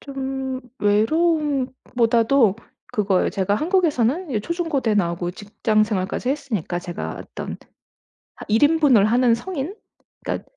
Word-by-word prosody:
좀 265 -1 -4 0.2
외로움보다도 255 - +2 0.4
그거예요. 205 -5 +1
제가 200 +1 0
한국에서는 315 - +1
이 220 -5 0
초중고대 300 - -1
나오고 175 -2 0
직장생활까지 215 +1 -1
했으니까 250 - -2
제가 170 - -6
어떤 - - -7 0.8
하 - - -11
1 220 +2 +2
인분을 290 -8 +5
하는 240 +2 +4
성인 320 - -4 0.5
그니까 - - -2
245 Hz, 290 characters per minute, -22 LUFS, 210-290 Hz, 0.8 s, 인분을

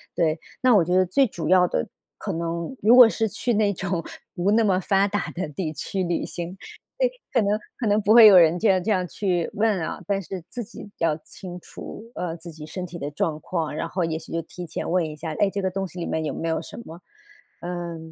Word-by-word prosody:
对， 160 -2 +1 0.2
那 255 -3 +5
我 180 -5 +5
觉 180 +2 +1
得 185 0 +5
最 270 +10 +4
主 165 -7 -4
要 180 -1 +6
的 80 - -1 0.3
可 - - -3
能 170 +5 -3
如 225 +4 +7
果 250 -3 +10
是 225 0 0
去 240 +3 -1
那 205 -1 +2
种 185 -2 -2 0.3
不 180 +3 +1
那 225 +2 +4
么 190 -3 +3
发 195 +1 +2
达 205 -1 -2
的 180 -1 -4
地 155 +1 -4
区 190 +4 -2
旅 175 -1 -1
行， 175 +1 -5 0.4
对， - - +3 0.2
可 245 - +4
能 205 +1 +1 0.2
可 230 - -2
能 210 +1 +3
不 210 +1 +4
会 230 -1 +10
有 200 -3 +9
人 170 -1 +6
这 220 - +3
样 190 -1 +3
这 220 - -2
样 185 -3 +1
去 175 -2 -1
问 210 -2 +1
啊， 160 - -4
但 200 -1 0
是 185 +1 -6
自 245 - -4
己 215 -1 -11
要 165 -2 +1
清 180 +2 -9
楚， 220 +5 -10
呃， 170 -2 -3
自 170 +1 -9
己 150 -1 -9
身 180 +3 -5
体 175 -1 -8
的 145 0 -4
状 150 +1 -1
况， 160 -3 -3
然 165 - -3
后 180 0 -1
也 160 -1 -2
许 160 - -11
就 165 - -1
提 175 +2 -9
前 - - -5
问 175 0 +2
一 155 - -5
下， 160 +1 -5
哎， 205 - +4
这 200 +1 -3
个 190 - 0
东 195 +1 -2
西 180 +1 -10
里 170 - -3
面 160 - -2
有 145 - -2
没 165 - -4
有 160 -1 0
什 - - -10
么， 165 +2 -11 0.6
呃， 175 -1 -4
180 Hz, 270 characters per minute, -24 LUFS, 165-205 Hz, 0.6 s, 果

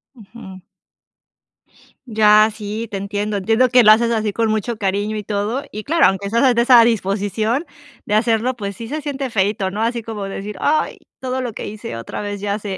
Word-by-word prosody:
Ujú. 195 -4 -12 1.4
Ya. 215 -2 +5
Sí, 215 +2 -5
te 200 - -4
entiendo. 205 +1 -3
Entiendo 225 +6 +2
que 250 0 +5
lo 215 - +8
haces 230 +2 +4
así 215 -2 -1
con 225 0 0
mucho 220 +2 -2
cariño 205 +2 -1
y 210 - -5
todo, 210 +6 -2
y 215 +1 -6
claro, 330 +6 +3
aunque 195 +1 -1
estás 235 +4 +3
de 235 - +3
esa 240 -1 +7
disposición 220 - 0 0.4
de 210 -4 0
hacerlo, 230 +3 +1
pues 200 -3 -5
sí, 230 +3 -8
se 305 +4 -4
siente 275 -2 -4
feíto, 195 -2 0
¿no?, 205 +3 -4
así 235 +1 -1
como 215 -2 -6
decir: 195 +1 -6
"Ay, 310 +1 0 0.2
todo 260 0 -3
lo 245 -4 -4
que - - -6
hice, 205 - -7
otra 115 - -6
vez 205 -1 -5
ya 205 0 -1
se 195 -2 -5
215 Hz, 195 wpm, -19 LUFS, 205-235 Hz, 1.4 s, lo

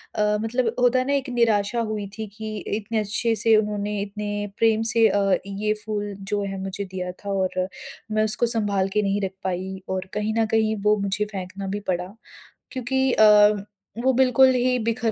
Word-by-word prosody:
अ, - - 0 0.2
मतलब 230 +1 -1
होता 250 +1 +4
है 255 - -1
ना 280 - +1
एक 275 -1 -1
निराशा 230 -2 +1
हुई 215 -3 -3
थी 220 - -4
कि 215 -1 -5 0.2
इतने 220 +1 -2
अच्छे 220 +2 0
से 225 0 +4
उन्होंने, 210 -1 -1
इतने 205 0 -4
प्रेम 225 -1 +3
से 230 -1 +5
अ, 200 -2 +2
ये 210 +2 -1
फूल 205 -1 -3
जो 205 +1 -2
है 195 -1 -4
मुझे 195 +1 -4
दिया 185 -1 -5
था 200 - -5
और 185 -1 -1 0.4
मैं 215 0 +2
उसको 215 +2 +3
सँभाल 205 -4 +1
के 210 - +2
नहीं 200 0 0
रख 195 -1 -2
पाई 190 +1 -4
और 190 0 -3
कहीं 210 +1 -1
न 225 - +3
कहीं 220 -1 +2
वो 210 0 +4
मुझे 200 +1 -1
फेंकना 195 -1 -6
भी 205 +2 -3
पड़ा। 180 +2 -2 0.6
क्योंकि 265 +1 0
अ, 210 -1 +5 0.4
वो 265 - +4
बिल्कुल 260 +1 +5
ही 250 0 +1
बिखर 230 0 0
210 Hz, 190 wpm, -23 LUFS, 200-225 Hz, 0.6 s, से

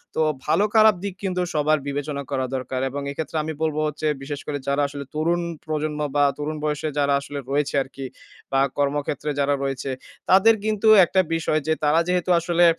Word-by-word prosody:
তো - - +1 0.2
ভালো-খারাপ 215 +1 +4
দিক 200 -2 -3
কিন্তু 180 -1 -1
সবার 155 0 +2
বিবেচনা 140 0 -3
করা 130 -1 0
দরকার। 130 0 -3
এবং 140 +2 -4
এক্ষেত্রে 155 +2 -4
আমি 160 +1 -4
বলবো 155 -1 0
হচ্ছে 150 +1 -3
বিশেষ 140 +1 -5
করে 145 - -2
যারা 140 +1 +1
আসলে 140 0 -7
তরুণ 170 +3 +1 0.2
প্রজন্ম 155 -1 -2 0.2
বা 145 - +4
তরুণ 155 +1 -3
বয়সে 150 0 -1
যারা 140 -1 +2
আসলে 145 0 -6
রয়েছে 145 0 0
আরকি। 135 0 -9 0.5
বা 135 - +2 0.2
কর্মক্ষেত্রে 145 +1 -1
যারা 140 0 +2
রয়েছে 135 0 -3 0.4
তাদের 195 +4 +6
কিন্তু 215 0 0 0.2
একটা 190 +2 +2
বিষয় 160 -1 +1
যে 160 - +3
তারা 150 +2 +4
যেহেতু 180 0 0
আসলে 175 +1 +3
150 Hz, 180 wpm, -23 LUFS, 140-170 Hz, 0.5 s, তাদের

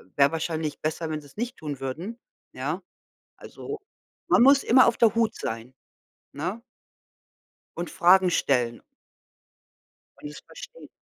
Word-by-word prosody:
wäre 140 0 +4
wahrscheinlich 160 -2 -3
besser, 160 +1 -3
wenn 155 -1 -3
sie's 145 -1 -18
nicht 240 +4 -4
tun 145 -4 -6
würden, 165 - -5 0.4
ja? 155 +8 -3 0.5
Also, 425 +1 -8 0.5
man - - +5
muss 275 +2 +6
immer 255 +1 +6
auf 235 - +2
der 225 -3 +4
Hut 230 -1 +1
sein, 115 +3 -5 0.6
ne 180 +10 -4 1.2
und 175 0 -4
Fragen 180 +1 +5
stellen. 125 -7 0 1.4
Und 145 - -7
das 150 - -10
verstehen. - - -12
165 Hz, 130 wpm, -26 LUFS, 145-230 Hz, 1.4 s, muss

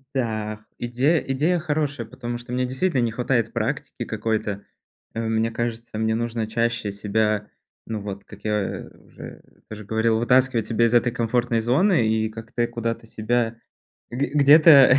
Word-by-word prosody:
Да, 110 -3 -2
идея 130 +7 +2
идея 155 +7 0
хорошая, 145 -6 -2
потому 120 0 -5
что 120 0 -10
мне, 125 +1 0
действительно, 130 +3 0
не 115 -2 +1
хватает 120 -1 0
практики - - -3
какой-то. 105 -3 -2 0.5
Э, 115 0 -2
мне 110 +1 +1
кажется, 115 -1 -4
мне 110 0 +1
нужно 115 -1 -2
чаще 115 -1 -1
себя, 105 +1 0 0.4
ну 110 -2 -4
вот, 100 -1 -7
как - - -14
я 105 -2 -2 0.2
уже - - -11 0.3
уже 105 -1 -8
говорил, 110 +1 +1
вытаскивать 125 -1 +3
себя 115 0 +2
из 115 - +1
этой 120 0 +3
комфортной 120 0 0
зоны 130 - +3
и 110 0 +1
как-то 115 +2 -3
куда-то 115 -1 -3
себя 115 +1 -1 0.5
г 135 +4 -1
где-то 145 -2 +8
115 Hz, 150 wpm, -23 LUFS, 110-125 Hz, 0.5 s, где-то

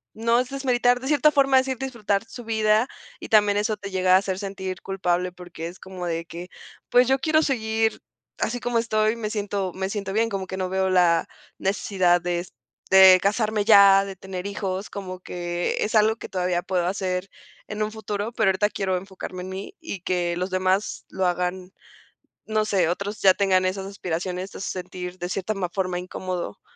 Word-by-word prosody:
no 230 +2 +2
es 250 +1 -1
desmeritar 245 -2 +2
de 265 - -6
cierta 300 +1 +4
forma 275 -2 +4
decir, 260 -1 +1
disfrutar 225 -6 -1
su 235 +2 -10
vida 220 +1 +2 0.3
y - - -9
también 205 -2 +4
eso 210 0 0
te 200 -1 -7
llega 185 -1 +2
a 185 - +9
hacer 190 -1 -3
sentir 190 -2 -5
culpable 180 -2 -1
porque 175 -2 -8
es 175 - -10
como, 185 -2 -7
de 165 -1 -2
que, 175 +2 -9 0.4
pues, 245 0 +5
yo 265 +1 +3
quiero 310 +3 +2
seguir 225 -5 0 0.4
así 245 +2 -1
como 245 -1 -1
estoy, 215 -1 +1
me 220 -2 -4
siento 200 -3 -2
me 190 +1 -3
siento 200 -2 -4
bien, 225 +2 +2
como 195 -3 -3
que 190 - -5
no 185 -1 -1
veo 190 0 0
la 175 -2 +3 0.3
necesidad 190 -2 +2
de 175 0 -2 0.5
de 190 -1 +9
casarme 210 0 +1
ya, 200 -2 +7
de 195 -1 -7
tener 185 0 -7
hijos, 195 -1 -4
como 185 -2 -6
que 175 -1 -3
es 220 - -2
algo 220 +1 +4
que - - -9
todavía 180 -2 0
puedo 180 -2 -1
hacer 185 0 -2 0.4
en 210 0 -5
un 215 - 0
futuro, 215 0 -4
pero 215 -5 +2
ahorita 200 +2 +2
quiero 190 -3 -1
enfocarme 185 -1 -7
en 185 - -7
mí 195 - -7
y 320 - -6
que 175 -1 -1
los 185 +1 -3
demás 185 +2 0
lo 190 - -1
hagan, 180 +1 -2 0.7
no 215 -1 0
sé, 190 -6 +2
otros 200 +4 -3
ya 190 -1 +7
tengan 190 -2 +2
esas 190 +1 -2
aspiraciones 185 0 -4
te - - -9
hace 195 - -4
sentir 180 0 -6
de 175 - -4
cierta 195 +3 -2
ma 185 -3 -2
forma 185 -1 -2
incómodo. 180 - -5
195 Hz, 195 wpm, -24 LUFS, 185-215 Hz, 0.7 s, a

